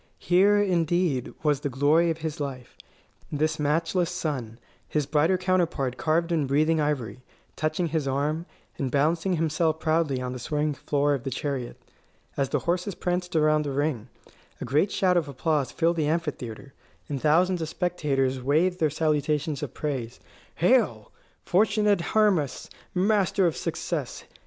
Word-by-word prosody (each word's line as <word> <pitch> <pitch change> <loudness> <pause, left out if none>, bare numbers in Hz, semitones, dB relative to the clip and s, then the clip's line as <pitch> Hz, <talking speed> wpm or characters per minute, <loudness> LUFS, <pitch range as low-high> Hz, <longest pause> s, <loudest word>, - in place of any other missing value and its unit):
Here, 195 +4 +4
indeed, 175 - +1
was 150 -3 +2
the 145 - -3
glory 145 +6 +3
of 165 - -1
his 155 -1 -4
life 130 -4 -6 0.6
this 155 +2 0
matchless 165 +4 +1
son, 135 -10 -4 0.3
his 150 -2 0
brighter 155 +6 +2
counterpart 175 -8 0
carved 165 +4 0
in 155 -5 +1
breathing 155 +3 +2
ivory, 130 -7 -2 0.3
touching 155 +4 -1
his 155 -3 -1
arm, 150 +5 -1 0.3
and 135 - -1
balancing 165 +7 +1
himself 160 -1 0
proudly 155 -5 +1
on 125 0 -4
the 125 - -6
swaying 150 +4 -1
floor 145 +2 0
of 135 -4 -3
the - - -3
chariot. 135 -1 -4 0.6
As 135 -2 0
the 145 - +1
horses 180 +2 -1
pranced 180 -1 -2
around 155 -1 +3
the 145 - -3
ring, 135 -5 -1 0.5
a - - -4
great 145 - +2
shout 180 -2 +2
of 165 -4 0
applause 145 0 -1
filled 170 +1 +1
the 155 -2 +1
amphitheatre, 140 -6 -3 0.3
and 140 -3 -4
thousands 175 +4 +3
of 160 - -3
spectators 140 -8 -1
waved 165 +8 +1
their 155 - +3
salutations 150 -1 0
of 145 -5 -6
praise: 130 -6 -4 0.4
"Hail, - - +2 0.3
fortunate 210 0 +3
Hermas, 185 -9 +1 0.2
master 195 0 +2
of 165 - +1
success! - - -4
155 Hz, 150 wpm, -26 LUFS, 140-170 Hz, 0.6 s, Here